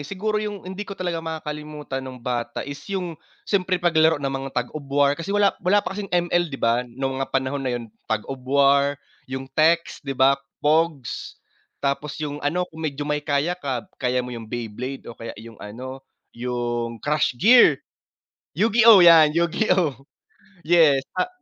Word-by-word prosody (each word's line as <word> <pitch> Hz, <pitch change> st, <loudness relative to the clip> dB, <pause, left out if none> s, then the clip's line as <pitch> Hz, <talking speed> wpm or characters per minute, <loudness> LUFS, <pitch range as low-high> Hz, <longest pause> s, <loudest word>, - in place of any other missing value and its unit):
siguro 210 Hz, +6 st, -2 dB
yung 205 Hz, -3 st, -5 dB
hindi 190 Hz, +2 st, -7 dB
ko 200 Hz, -1 st, -8 dB
talaga 175 Hz, -2 st, -2 dB
makakalimutan 150 Hz, -3 st, -5 dB
nung 130 Hz, -1 st, -8 dB
bata 120 Hz, -1 st, -3 dB
is 140 Hz, 0 st, -7 dB
yung 180 Hz, -4 st, -3 dB, 0.3 s
siyempre 185 Hz, -2 st, +1 dB
paglaro 160 Hz, -2 st, +3 dB
ng 140 Hz, -1 st, -3 dB
mga 135 Hz, 0 st, -4 dB
Tag 125 Hz, 0 st, 0 dB
of 155 Hz, -, -6 dB
War, 140 Hz, 0 st, +3 dB
kasi 165 Hz, +5 st, -6 dB
wala 205 Hz, 0 st, +3 dB
wala 200 Hz, +3 st, +2 dB
pa -, -, -3 dB
kasing 200 Hz, 0 st, -5 dB
ML 175 Hz, 0 st, +1 dB
'di 135 Hz, -, -6 dB
ba, 120 Hz, +2 st, +1 dB
nung 135 Hz, +2 st, -3 dB
mga 135 Hz, -, -2 dB
panahon 135 Hz, +1 st, -1 dB
na 130 Hz, -, -1 dB
yun 120 Hz, -, -6 dB, 0.2 s
Tag 110 Hz, -1 st, -1 dB
of 135 Hz, -1 st, -6 dB
War, 140 Hz, 0 st, +4 dB, 0.3 s
yung 130 Hz, 0 st, -4 dB
text 165 Hz, +3 st, +2 dB
'di 135 Hz, -2 st, -5 dB
ba, 135 Hz, +1 st, +4 dB, 0.2 s
pogs. 155 Hz, -3 st, 0 dB, 0.4 s
Tapos 145 Hz, +2 st, -2 dB
yung 145 Hz, -1 st, -4 dB
ano 175 Hz, +5 st, 0 dB
kung 160 Hz, -, -10 dB
medyo 145 Hz, -2 st, -3 dB
may 150 Hz, 0 st, -1 dB
kaya 145 Hz, +4 st, 0 dB
ka, 135 Hz, -8 st, -4 dB, 0.2 s
kaya 125 Hz, -1 st, 0 dB
mo 125 Hz, -, -7 dB
yung 115 Hz, -2 st, -8 dB
Beyblade 120 Hz, +3 st, -5 dB
o 120 Hz, -, -8 dB
kaya 115 Hz, -2 st, -8 dB
yung 115 Hz, -1 st, -12 dB
ano 130 Hz, +6 st, -8 dB, 0.3 s
yung 120 Hz, -1 st, -3 dB
Crush 150 Hz, -2 st, 0 dB
Gear, 220 Hz, -, +6 dB, 0.8 s
Yu-Gi-Oh 220 Hz, +1 st, +6 dB
yan, 160 Hz, -3 st, +7 dB
Yu-Gi-Oh 170 Hz, -2 st, +1 dB, 0.7 s
yes. 155 Hz, -5 st, +4 dB
Ta 185 Hz, -, -1 dB
145 Hz, 175 wpm, -23 LUFS, 130-175 Hz, 0.8 s, yan